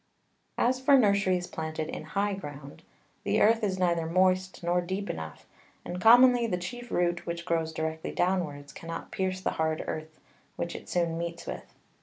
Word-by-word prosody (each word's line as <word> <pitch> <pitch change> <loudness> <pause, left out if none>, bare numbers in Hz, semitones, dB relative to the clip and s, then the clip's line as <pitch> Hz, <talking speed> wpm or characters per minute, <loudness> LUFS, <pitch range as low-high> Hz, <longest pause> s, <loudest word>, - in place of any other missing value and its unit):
As 255 +2 +2
for 275 +1 +6
Nurseries 200 -5 +3
planted 160 -2 -4
in - - -5
high 200 +6 -1
Ground, 145 -7 -8 0.4
the - - +1
Earth 225 +1 +4
is 190 -2 0
neither 170 -3 +1
moist 185 +1 +1
nor 175 +1 +2
deep 190 +3 -3
enough, 80 -1 -8 0.4
and 180 +1 -5
commonly 245 +1 +7
the 180 - -1
chief 240 +7 -7
Root 175 -2 0
which 170 0 -4
grows 165 -2 0
directly 160 0 -3
downwards, 165 -6 -1
cannot 165 0 -7
pierce 185 0 -2
the - - 0
hard 160 0 0
Earth 155 0 -6 0.4
which 170 - -4
it - - -9
soon 170 -2 0
meets 170 0 -5
with. - - -7
175 Hz, 170 wpm, -29 LUFS, 160-195 Hz, 0.4 s, commonly